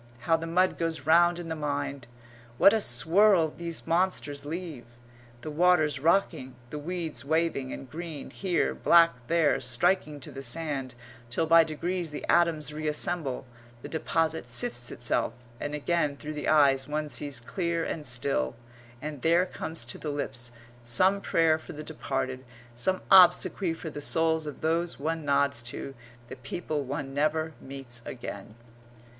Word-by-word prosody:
How 165 +6 +3
the 165 0 -4
mud 180 +3 +2
goes 165 -1 -1
round 170 +2 +5
in 175 -1 -6
the 160 - -3
mind 145 -4 -3 0.5
what 200 - +7
a 220 - +2
swirl 170 - +4
these 170 -2 -5
monsters 165 -5 0
leave, 160 -6 -6 0.6
the 155 - -6
waters 155 -3 +3
rocking, 145 -5 +1 0.2
the 150 - -4
weeds 165 0 -4
waving 160 -3 0
and 135 - -7
green 160 0 -7
here, 175 - 0
black 165 - +5 0.2
there, 165 -1 +3
striking 150 +5 +1
to 150 - -6
the 135 0 -7
sand, 135 -1 -3 0.3
till 140 +7 +1
by 165 +1 +7
degrees 170 +2 -3
the 150 - -6
atoms 160 -4 +2
reassemble, 150 -2 -2 0.4
the - - -5
deposit 160 -3 -1
sifts 120 0 0
itself, 120 0 -1 0.3
and 145 0 -3
again 150 -1 0
through 155 +1 -6
the 150 - -4
eyes 140 -3 +4
one 150 +1 -2
sees 145 -3 -2
clear 170 +6 -2
and 150 -3 -4
still, 120 - -1 0.5
and 150 -3 -5
there 170 +2 +4
comes 160 -6 -5
to 120 - -5
the 155 - -4
lips 120 -4 -3 0.3
some 185 +12 +2
prayer 165 -4 +2
for 165 - -10
the 155 0 -7
departed, 135 -4 -3 0.3
some 185 +11 0
obsequy 180 0 +6
for 160 - -6
the 145 - -7
souls 160 0 +1
of 150 - -7
those 165 +1 0
one 160 +2 -2
nods 140 -3 +2
to, 125 +3 -5 0.3
the - - -8
people 155 0 -4
one 135 0 -5
never 155 +2 0
meets 135 -3 -7
again. 105 -4 -8
155 Hz, 155 wpm, -28 LUFS, 135-170 Hz, 0.6 s, what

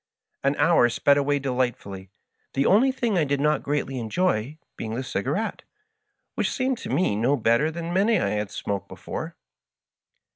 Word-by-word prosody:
'^ - - -54
An - - +2
hour 120 - +4
sped 140 +4 +3
away 145 0 +1
delightfully, 120 -8 -3 0.5
the 135 +1 +2
only 245 +7 +5
thing 235 -7 0
I - - +3
did 140 -1 0
not 150 0 +2
greatly 140 -2 -2
enjoy 130 +1 -1 0.2
being 110 0 -5
the 130 - -3
cigarette, 135 - -2 0.7
which - - 0
seemed 260 -2 -1
to - - -7
me 175 - +1
no 120 +7 +2
better 120 +7 +2
than 170 +1 -5
many 205 +3 +3
I - - 0
had 105 -1 -2
smoked 100 -1 -4
before. - - -7
140 Hz, 170 wpm, -25 LUFS, 115-175 Hz, 0.7 s, only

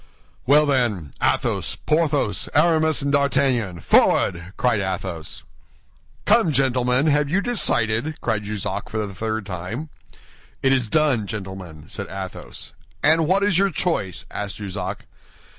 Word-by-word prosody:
"Well, 150 +3 +6
then, 115 - 0
Athos, - - 0
Porthos, 150 - 0
Aramis, 160 -1 +3
and 140 - 0
D'Artagnan, 135 - +1
forward!" 85 +3 +2
cried 125 -4 +2
Athos. 95 -4 -4 0.8
"Come, 160 - +4
gentlemen, 130 0 +2
have 150 -1 +2
you 185 +6 +2
decided?" 150 - +1
cried 110 -3 -1
Jussac 105 -1 -4
for 110 -1 -2
the 100 - -8
third 110 +1 -3
time. 100 - -5 0.7
"It 135 0 +4
is 130 -4 +1
done, 135 -6 +2
gentlemen," 95 -7 -7
said - - -5
Athos. 95 -1 -7 0.3
"And 160 +1 +4
what 190 +3 +3
is 200 -3 +3
your 200 0 +3
choice?" 155 - -2
asked 100 -2 -4
Jussac. 95 -1 -5
120 Hz, 130 wpm, -22 LUFS, 95-150 Hz, 0.8 s, Well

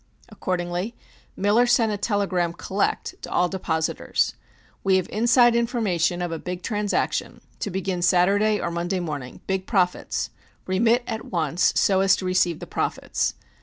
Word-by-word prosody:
Accordingly 180 +1 -3 0.4
Miller 210 +5 +3
sent 230 -2 +3
a - - 0
telegram 195 -5 0
(collect) 195 +3 -2
to - - -7
all 180 - +2
depositors: 160 -4 -1 0.5
We 195 -1 +3
have 185 -1 +1
inside 240 +2 +4
information 195 -8 +1
of 175 - -3
a 165 - -3
big 180 +1 -5
transaction, 210 -2 -1 0.2
to - - -2
begin 190 -1 -2
Saturday 200 +4 +3
or 170 - -2
Monday 175 +2 -1
morning. 145 -7 -5
Big 190 -1 -2
profits. 180 -4 0 0.3
Remit 230 +6 +2
at 220 - -4
once 165 -1 +1
so 190 -1 +3
as 195 0 +5
to 185 - -5
receive 185 -3 +2
the - - -8
profits. - - -2
190 Hz, 150 wpm, -24 LUFS, 175-210 Hz, 0.5 s, as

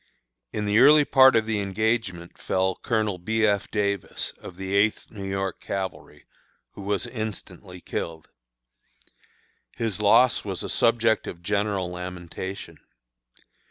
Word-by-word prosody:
In 105 - -3
the 105 +2 +3
early 145 +3 +7
part 130 -2 +6
of 110 -1 +3
the 110 -1 -1
engagement 100 -3 -2
fell 95 0 0
Colonel 110 -5 -1
B. 110 +5 +1
F. 100 -1 +1
Davis, 100 -3 -2
of 90 - -10
the 95 +1 -5
Eighth 105 +2 +1
New 100 -3 -6
York 95 0 -3
Cavalry, 95 -1 -6 0.5
who - - -11
was 100 0 -1
instantly 95 -5 -7
killed. 80 -2 -5 1.5
His 110 -3 -2
loss 120 +4 +5
was 95 -3 -4
a - - -4
subject 115 -1 +2
of 85 0 -8
general 100 -2 -1
lamentation. 90 -1 -7
100 Hz, 130 wpm, -25 LUFS, 95-110 Hz, 1.5 s, early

